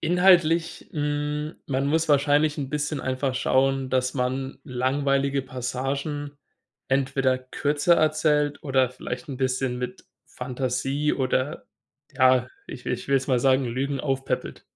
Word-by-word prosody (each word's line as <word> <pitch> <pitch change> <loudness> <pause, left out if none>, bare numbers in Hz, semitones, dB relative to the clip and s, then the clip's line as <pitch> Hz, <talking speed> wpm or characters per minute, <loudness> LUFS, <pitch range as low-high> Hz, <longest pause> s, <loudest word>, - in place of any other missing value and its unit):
Inhaltlich, 170 -1 +3
hm 150 0 -2
man 135 0 0
muss 160 +2 +1
wahrscheinlich 145 +1 +3
'n 135 - -3
bisschen 150 0 -2
einfach 130 0 -1
schauen, 135 0 +2
dass 130 0 0
man 130 +1 -2
langweilige 140 +1 0
Passagen 135 +3 -3 0.6
entweder 135 -1 +1
kürzer 145 +5 +1
erzählt 150 -2 +2
oder 130 -3 +2
vielleicht 125 +1 -6
'n 135 - -5
bisschen 130 -1 -1
mit 125 0 -6 0.2
Fantasie 135 +3 -2
oder 130 +1 -1 0.5
ja, 130 -1 +4 0.2
ich 125 - -9
ich 125 -1 -3
will 140 - +3
jetzt 135 +1 -2
mal 130 -2 +3
sagen, 130 +1 +3
Lügen 135 +3 -2
aufpäppelt. 135 -2 -2
135 Hz, 130 wpm, -25 LUFS, 130-145 Hz, 0.6 s, ja